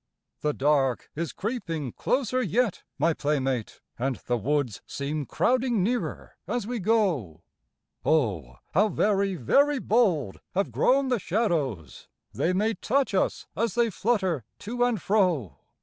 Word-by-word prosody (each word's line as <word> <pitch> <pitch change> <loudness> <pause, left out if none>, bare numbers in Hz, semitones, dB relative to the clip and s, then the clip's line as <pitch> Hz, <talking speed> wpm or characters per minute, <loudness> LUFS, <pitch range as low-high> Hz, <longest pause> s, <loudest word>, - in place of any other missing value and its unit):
The 150 -1 0
dark 135 -3 +1
is 165 -2 -2
creeping 165 - -3
closer 255 - 0
yet, 230 -1 0 0.2
my 160 +4 +3
playmate, 135 -6 -1 0.2
And 130 +1 0
the 125 - +1
woods 125 -2 -1
seem 145 +1 -3
crowding 245 -5 +1
nearer 240 +4 -2
as 245 -4 -1
we 240 +1 -3
go, 175 - 0 0.6
Oh, 95 - +1 0.2
how 210 +6 +4
very, 200 -2 +1
very 280 - +3
bold 195 - +1 0.2
have 195 +1 0
grown 270 +1 +3
the 245 -3 +1
shadows, 165 - -1 0.3
They 175 - +1
may 210 +5 +1
touch 255 +5 0
us 190 - 0
as 230 0 -1
they 235 -2 +2
flutter 190 - 0 0.2
to 245 +3 -1
and 245 -4 +1
fro! 180 - +1
185 Hz, 135 wpm, -27 LUFS, 140-230 Hz, 0.6 s, how